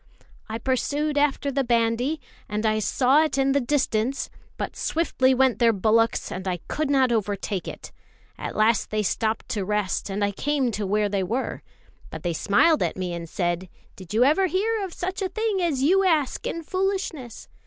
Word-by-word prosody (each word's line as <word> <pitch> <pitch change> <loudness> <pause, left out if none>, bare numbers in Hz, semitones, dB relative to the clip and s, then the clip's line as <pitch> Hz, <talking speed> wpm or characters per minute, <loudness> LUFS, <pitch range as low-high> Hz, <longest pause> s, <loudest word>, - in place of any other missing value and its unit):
"I 220 - -3
pursued 285 +5 -1
after 285 -1 +1
the 275 0 0
bandy, 240 +5 +1 0.3
and 210 +1 -2
I 215 0 +2
saw 260 +7 +3
it 305 -3 -1
in 270 0 +3
the 280 +1 +2
distance; 260 -1 0 0.3
but - - -4
swiftly 265 -5 +1
went 260 -1 +3
their 235 -1 +5
bullocks, 225 +3 +1
and 185 +1 -5
I 180 -1 0
could 305 -2 -2
not 265 -3 +3
overtake 205 -4 -2
it. - - -8 0.4
At - - -6
last 215 0 +2
they 215 0 0
stopped 220 +2 -1
to 205 - -1
rest, 210 0 -1
and 200 +1 -2
I 200 - -1
came 275 +3 0
to 205 -2 -3
where 210 +1 +2
they 200 -1 -1
were. 230 +8 -2 0.5
But - - -8
they 175 -1 -1
smiled 210 - +3
at - - -1
me 180 -2 -3
and 170 -1 -6
said: 175 -1 -2 0.3
'Did 185 -3 -12
you 225 +3 +4
ever 310 +8 +4
hear 415 +5 0
of 380 - -5
such 370 +3 -4
a 380 - -1
thing 435 -3 -1
as 295 -7 0
you 380 +7 +4
ask 315 -8 +1
in 335 - -4
foolishness? 370 - -3
250 Hz, 190 wpm, -25 LUFS, 210-295 Hz, 0.5 s, their